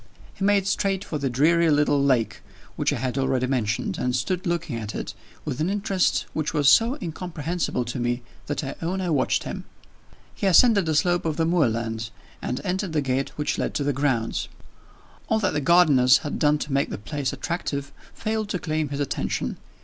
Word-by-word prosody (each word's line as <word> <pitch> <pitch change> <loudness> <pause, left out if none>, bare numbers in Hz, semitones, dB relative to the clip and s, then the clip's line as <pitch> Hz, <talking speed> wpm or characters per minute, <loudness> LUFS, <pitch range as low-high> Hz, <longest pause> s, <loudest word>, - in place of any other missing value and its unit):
He - - -6
made 200 -1 +3
straight 195 0 0
for 155 -6 -4
the 140 -1 -1
dreary 165 +6 +3
little 145 -1 +3
lake 130 -5 +1 0.3
which - - +1
I - - 0
have 130 +2 -2
already 130 -1 +1
mentioned, 120 -4 -1
and 125 0 0
stood 185 +7 -1
looking 170 -6 -1
at 110 -2 -5
it - - -4 0.3
with - - -3
an 165 - +1
interest 195 -2 +1
which 155 -1 -2
was 145 -2 +3
so 235 +5 +5
incomprehensible 165 -5 -3
to 120 +2 -4
me, 120 0 -1 0.2
that 145 +1 -2
I 135 - -4
own 180 +3 -1
I 180 -2 -1
watched 135 -4 +1
him. - - -5 0.7
He 200 - -1
ascended 200 -1 +5
the 155 - +1
slope 175 +3 +2
of 160 -2 -2
the 165 - +2
moorland, 115 -9 0 0.3
and 125 - -2
entered 190 -2 -2
the 150 - +2
gate 135 0 -1
which 150 - -1
led - - -2
to 150 - 0
the 145 0 +1
grounds. 130 -4 0 0.8
All 220 - +3
that 200 -4 0
the 150 - 0
gardeners 140 -6 +6
had 145 - -3
done 150 0 +4
to 150 -1 -4
make 140 0 +1
the - - -4
place 140 +5 -3
attractive 140 -5 -3 0.2
failed 220 -1 -3
to 190 - -1
claim 155 -3 -2
his 140 0 -4
attention. 140 - -2
150 Hz, 195 wpm, -24 LUFS, 130-180 Hz, 0.8 s, gardeners